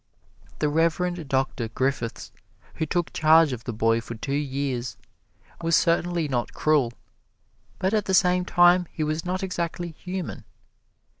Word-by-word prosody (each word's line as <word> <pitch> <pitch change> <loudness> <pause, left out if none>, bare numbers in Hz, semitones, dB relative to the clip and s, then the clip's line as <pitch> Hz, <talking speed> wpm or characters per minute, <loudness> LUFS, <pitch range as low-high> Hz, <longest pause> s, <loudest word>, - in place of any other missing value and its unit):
The 150 - +1
Reverend 165 +2 0
Doctor 130 -3 0
Griffiths, 125 0 -2 0.4
who 160 - -3
took 175 +2 -1
charge 155 -2 +5
of 120 -1 -7
the 120 - -3
boy 115 +1 +1
for 115 0 -8
two 135 +5 -4
years, 135 -3 -2 0.6
was 165 -1 +2
certainly 170 0 +1
not 125 -4 -2
cruel, 150 -6 +2 0.9
but 190 +3 0
at 215 -2 +1
the 190 - +2
same 180 -2 +3
time 175 0 +4
he 155 - -3
was 155 +2 -2
not 185 +1 -2
exactly 175 -2 -3
human. 180 +2 -6
160 Hz, 145 wpm, -25 LUFS, 135-175 Hz, 0.9 s, charge